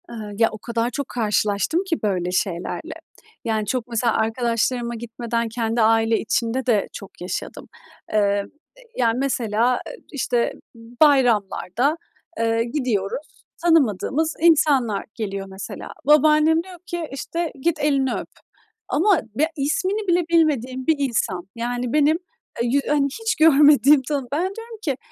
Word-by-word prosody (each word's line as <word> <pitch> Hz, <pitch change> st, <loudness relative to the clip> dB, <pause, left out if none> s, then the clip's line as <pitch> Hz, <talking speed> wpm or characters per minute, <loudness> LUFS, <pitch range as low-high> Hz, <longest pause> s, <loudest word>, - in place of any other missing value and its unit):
Eee, -, -, -8 dB, 0.2 s
ya, 225 Hz, -, +5 dB
o 215 Hz, -, -7 dB
kadar 235 Hz, +2 st, -2 dB
çok 280 Hz, +1 st, -4 dB
karşılaştım 215 Hz, -, 0 dB
ki 360 Hz, -5 st, -2 dB
böyle 180 Hz, -4 st, 0 dB
şeylerle. 180 Hz, -1 st, -2 dB, 0.5 s
Yani, 220 Hz, -2 st, 0 dB
çok 250 Hz, +2 st, -2 dB
mesela 235 Hz, -1 st, 0 dB
arkadaşlarıma 235 Hz, +1 st, 0 dB
gitmeden 235 Hz, 0 st, -3 dB
kendi 230 Hz, 0 st, -1 dB
aile 225 Hz, 0 st, +3 dB
içinde 235 Hz, +3 st, -1 dB
de 220 Hz, -5 st, +2 dB
çok 195 Hz, -, -11 dB
yaşadım. 180 Hz, -, -5 dB, 0.5 s
Eee, 200 Hz, -1 st, +2 dB, 0.5 s
yani, 235 Hz, -2 st, +2 dB
mesela, 245 Hz, -2 st, +1 dB
eee, -, -, -7 dB, 0.2 s
işte, 245 Hz, -5 st, 0 dB, 0.5 s
bayramlarda, 250 Hz, -, +3 dB, 0.4 s
eee, 230 Hz, 0 st, +1 dB
gidiyoruz, 250 Hz, -, -3 dB, 0.2 s
tanımadığımız 315 Hz, -, +2 dB
insanlar 285 Hz, -10 st, +3 dB
geliyor 195 Hz, -4 st, -4 dB
mesela. 190 Hz, +1 st, -8 dB, 0.2 s
Babaannem 305 Hz, +2 st, +5 dB
diyor 370 Hz, -1 st, -12 dB
ki 345 Hz, -3 st, -4 dB
işte, 330 Hz, +4 st, -3 dB
"Git, 330 Hz, +1 st, 0 dB
elini 275 Hz, -3 st, +1 dB
öp," -, -, -5 dB, 0.6 s
ama 375 Hz, +2 st, +3 dB
b 285 Hz, -, +1 dB
ismini 375 Hz, +9 st, -1 dB
bile 350 Hz, 0 st, +3 dB
bilmediğim 265 Hz, -6 st, +1 dB
bir 320 Hz, -, +4 dB
insan. 225 Hz, -9 st, -1 dB
Yani 245 Hz, +1 st, -3 dB
benim, 300 Hz, +1 st, +4 dB, 0.5 s
eee, -, -, 0 dB
yü 275 Hz, +4 st, +3 dB
eee, 295 Hz, +1 st, 0 dB, 0.2 s
hiç 450 Hz, 0 st, 0 dB
görmediğim, 295 Hz, -2 st, +6 dB
tanı 275 Hz, -1 st, -3 dB
Ben 295 Hz, +3 st, 0 dB
diyorum 455 Hz, 0 st, -9 dB
ki 280 Hz, -, -2 dB
250 Hz, 135 wpm, -22 LUFS, 225-300 Hz, 0.6 s, görmediğim